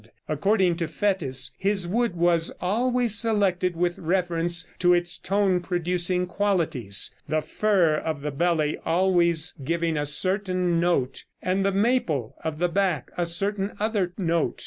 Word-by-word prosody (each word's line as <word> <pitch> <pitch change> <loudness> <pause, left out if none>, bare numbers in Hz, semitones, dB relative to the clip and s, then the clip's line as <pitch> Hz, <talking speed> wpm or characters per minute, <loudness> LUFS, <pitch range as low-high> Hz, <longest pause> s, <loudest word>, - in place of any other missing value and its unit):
According 180 +3 +1
to 170 -2 -2
Fétis, 155 -6 -1
his 195 -2 0
wood 230 +1 0
was 170 -1 +2
always 240 +4 +1
selected 195 -5 +1
with 175 +1 -1
reference 175 0 0
to 175 0 +5
its 175 0 -1
tone 195 -2 +1
producing 180 0 -1
qualities 165 - 0 0.2
the 155 +1 +1
fir 180 -5 +2
of 155 -2 -3
the 150 +1 -3
belly 155 0 0
always 170 -2 +2
giving 165 +2 -1
a 145 0 -1
certain 185 +1 +1
note, 155 -7 0
and 185 +2 0
the 195 - +2
maple 195 - 0
of 160 -1 -3
the 175 +2 +1
back 180 -5 -1
a 175 -1 -1
certain 195 +3 -1
other 205 -4 0
note. 170 -4 0
175 Hz, 145 wpm, -25 LUFS, 165-195 Hz, 0.2 s, to